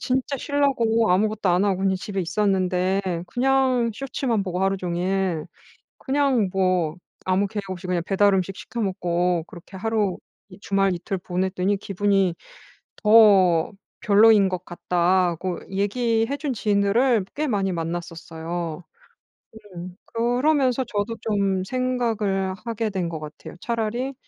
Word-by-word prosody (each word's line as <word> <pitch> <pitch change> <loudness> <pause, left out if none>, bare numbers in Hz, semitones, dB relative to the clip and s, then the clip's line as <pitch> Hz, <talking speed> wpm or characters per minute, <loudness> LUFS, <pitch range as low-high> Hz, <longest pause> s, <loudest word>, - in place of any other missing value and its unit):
진짜 260 +2 -1
쉬려고 235 -6 +1
아무것도 210 +1 +1
안 180 +3 +3
하고 195 -2 +1
그냥 195 -1 +2
집에 195 +1 -4
있었는데 185 0 0 0.2
그냥 255 +1 +2
쇼츠만 255 -4 -2
보고 185 0 -3
하루종일 185 -2 -1 0.5
그냥 265 -7 +1
뭐 185 -4 +1 0.3
아무 190 +2 +1
계획 205 0 -5
없이 185 0 -6
그냥 175 -2 0
배달 200 0 +3
음식 190 +1 -1
시켜 235 - -7
먹고 175 -3 0
그렇게 175 +3 -13
하루 210 -3 -1 0.3
이 185 - -14
주말 195 -2 +1
이틀 180 +2 -4
보냈더니 185 +2 -1
기분이 195 -2 +1 0.7
더 200 -7 +6 0.3
별로인 210 -1 +6
것 185 -1 -4
같다."고 175 0 0
얘기해 225 +5 0
준 285 -2 -2
지인들을 210 +2 +2
꽤 305 +1 -1
많이 195 -6 0
만났었어요. 165 0 -5 0.9
음. 180 +1 -8
그러면서 255 +2 +1
저도 210 +2 -2
좀 195 -3 0
생각을 225 -6 -1
하게 225 -2 -2
된 185 -3 -2
것 160 -2 -5
같아요. 155 +2 -10
차라리 235 +5 -2
195 Hz, 275 characters per minute, -23 LUFS, 180-230 Hz, 0.9 s, 더